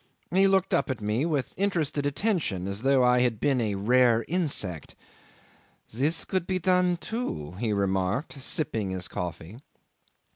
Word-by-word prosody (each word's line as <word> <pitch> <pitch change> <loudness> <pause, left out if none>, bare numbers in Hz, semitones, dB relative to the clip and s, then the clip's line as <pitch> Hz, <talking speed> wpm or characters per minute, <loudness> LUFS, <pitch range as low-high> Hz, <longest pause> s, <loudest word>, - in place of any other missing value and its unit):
He 190 +2 +4
looked 190 -1 +2
up 175 - +1
at 130 - -2
me 110 +8 -1
with 145 -6 -2
interested 165 -7 0
attention, 145 - -1
as 100 +2 -3
though 135 0 +3
I 125 0 +4
had 120 -3 +1
been 135 -4 +1
a 105 -3 -1
rare 115 +3 +3
insect. 140 - 0 1.0
"This 145 +8 -1
could 185 -2 -2
be 185 - 0
done, 180 0 +2
too," 195 - -4
he 115 -1 -1
remarked, 100 - -1
sipping 120 -8 -2
his 95 -1 -2
coffee. 90 +5 -6
130 Hz, 150 wpm, -27 LUFS, 105-170 Hz, 1.0 s, He